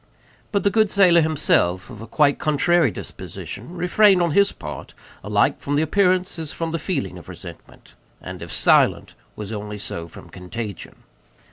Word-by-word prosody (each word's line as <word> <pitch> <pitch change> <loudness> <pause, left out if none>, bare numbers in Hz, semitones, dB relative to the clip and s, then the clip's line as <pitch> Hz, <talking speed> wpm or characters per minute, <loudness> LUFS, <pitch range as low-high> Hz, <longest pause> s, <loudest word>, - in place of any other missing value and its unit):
But 200 -3 0
the 200 - +2
good 215 -1 +3
sailor, 180 -4 +5
himself 135 - +1
of 110 -3 -10
a 115 - -9
quite 145 +4 +2
contrary 155 +1 +2
disposition, 170 - -8
refrained, 190 +2 +4
on 170 -2 +1
his 200 +5 +4
part, - - -9 0.3
alike - - +1
from 145 - -2
the 150 - +2
appearance 185 +1 +1
as 160 -2 -5
from 165 -1 -4
the 165 - -2
feeling 155 -3 -3
of - - -15
resentment, - - -12 0.3
and - - -9
if - - -8
silent, - - +3 0.2
was 105 +1 -6
only 105 0 -6
so 85 -4 -6
from - - -14
contagion. 100 +1 -8
155 Hz, 165 wpm, -22 LUFS, 110-180 Hz, 0.3 s, sailor